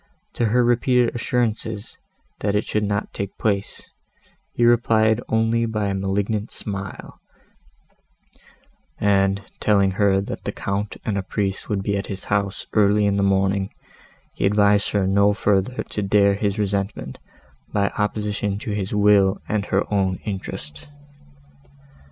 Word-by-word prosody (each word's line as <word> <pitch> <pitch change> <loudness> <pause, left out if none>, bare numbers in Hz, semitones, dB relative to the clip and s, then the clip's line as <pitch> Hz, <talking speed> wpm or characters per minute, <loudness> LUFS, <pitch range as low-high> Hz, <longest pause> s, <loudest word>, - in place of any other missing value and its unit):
To 120 - 0
her 120 +3 +3
repeated 120 0 +2
assurances, 115 -3 -2 0.4
that 100 0 0
it 105 - +2
should 105 - -1
not 100 +1 -2
take 100 -1 -5
place, 100 -3 -1 0.6
he 120 - +1
replied 110 -1 +3
only 115 +1 +2
by 105 -2 -1
a - - -1
malignant 100 +2 -1
smile; 100 -2 -7 1.8
and, 100 -1 +2 0.2
telling 100 -2 +3
her 95 0 +2
that 100 - -5
the - - -2
Count 100 +1 -3
and 100 -2 0
a - - -1
priest 95 0 -3
would 100 -3 -1
be 100 0 0
at 100 - -4
his 100 -2 -6
house, 100 -1 -1
early 105 0 +4
in 100 -1 +1
the - - +2
morning, 95 0 +1 0.6
he - - +1
advised 100 0 +3
her 100 -2 +1
no 100 +2 +4
further 100 +4 0
to 105 - -4
dare 100 0 +4
his 100 0 -1
resentment, 100 -1 -2 0.5
by 100 -1 +1
opposition 105 -1 -1
to 105 - -5
his 100 0 -2
will 100 -1 +4
and 105 -1 -1
to - - -14
her 100 +2 0
own 95 -2 +1
interest. 75 - -6
100 Hz, 145 wpm, -22 LUFS, 100-105 Hz, 1.8 s, early